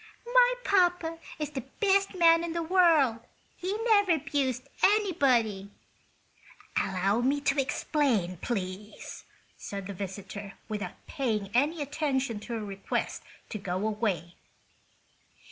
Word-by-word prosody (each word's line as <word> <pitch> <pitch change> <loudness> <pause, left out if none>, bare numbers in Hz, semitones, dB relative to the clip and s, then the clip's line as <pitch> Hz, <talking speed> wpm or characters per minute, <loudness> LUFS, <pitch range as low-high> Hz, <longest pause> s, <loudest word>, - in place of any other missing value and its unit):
"My - - +6
papa 355 -4 +2 0.2
is 300 -2 -3
the 270 -3 -4 0.2
best 395 -1 +3
man 335 -1 +5
in 335 -1 -3
the 335 0 -1
world. 320 -9 +4 0.4
He 375 +3 -3
never 405 -7 +4
'bused 270 -4 -1 0.2
anybody!" 265 - +3 1.1
"Allow 195 +3 +1
me 275 +4 +2
to 280 0 +2
explain, 260 - 0
please," 195 0 -5 0.3
said 200 -1 -6
the 200 - -5
visitor, 195 +1 -7
without 210 -2 -6
paying 215 -8 -2
any 295 +5 +2
attention 275 -5 -1
to 235 +3 -7
her 220 -2 -3
request 195 -1 -3 0.3
to 215 - -5
go 180 -2 -3
away. 205 -6 -1
265 Hz, 120 wpm, -29 LUFS, 205-330 Hz, 1.1 s, My